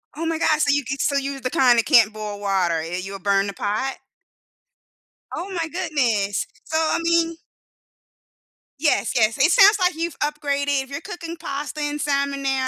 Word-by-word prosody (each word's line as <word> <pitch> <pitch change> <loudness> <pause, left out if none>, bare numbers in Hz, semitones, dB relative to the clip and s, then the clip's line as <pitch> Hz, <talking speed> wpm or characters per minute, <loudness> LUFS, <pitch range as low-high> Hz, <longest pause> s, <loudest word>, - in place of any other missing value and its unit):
Oh 330 - -4
my 325 -1 -1
god, 310 -1 +2
so 285 - +2
you 285 0 +1
can 270 +3 -4
so 280 - +1
you're 275 0 -3
the 255 - -3
kind 245 -2 +4
that - - +1
can't 220 -3 +5
boil 210 -1 -6
water, 190 -4 0
eh 165 +2 -4
you'll 195 +1 -7
burn 200 0 +1
the 200 - -5
pot? 215 +8 -2 1.4
Oh 370 - -5
my 335 -3 -2
goodness. 245 - 0 0.2
So, 315 - -2
I 320 0 +1
mean 335 0 +2 1.4
Yes, 305 -1 +1
yes. 220 -1 +2
It 290 +6 +4
sounds 410 +2 +7
like 360 -3 +2
you've 335 -1 -4
upgraded, 285 -2 -1
if 265 - -16
you're 280 +3 -5
cooking 335 -1 -7
pasta 295 +1 -5
and 295 0 -2
salmon 280 -1 -1
now, 270 -1 0
280 Hz, 185 wpm, -22 LUFS, 220-315 Hz, 1.4 s, sounds